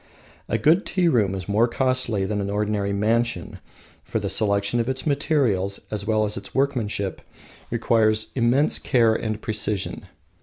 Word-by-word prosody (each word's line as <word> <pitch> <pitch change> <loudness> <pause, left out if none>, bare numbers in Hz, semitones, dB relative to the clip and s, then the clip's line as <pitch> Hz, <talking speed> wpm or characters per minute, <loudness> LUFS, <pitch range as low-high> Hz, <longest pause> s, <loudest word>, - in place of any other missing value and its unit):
A - - +1
good 170 +7 +3
tea 185 -2 0
room 105 - +2
is 95 -3 -6
more 110 +4 +3
costly 130 -5 0
than 105 +1 -2
an 100 - -3
ordinary 105 -1 -1
mansion, 110 -1 -1 0.4
for - - -3
the - - -2
selection 100 +2 +1
of 115 +2 -1
its 130 0 -3
materials, 135 - +1
as 105 -1 -4
well 110 -1 +2
as 105 - -3
its 100 - -9
workmanship, 115 -8 -1 0.5
requires 110 -2 +1
immense 130 +4 +2
care 115 -4 +3
and 110 -1 -3
precision. 105 -2 -3
110 Hz, 155 wpm, -23 LUFS, 100-125 Hz, 0.5 s, good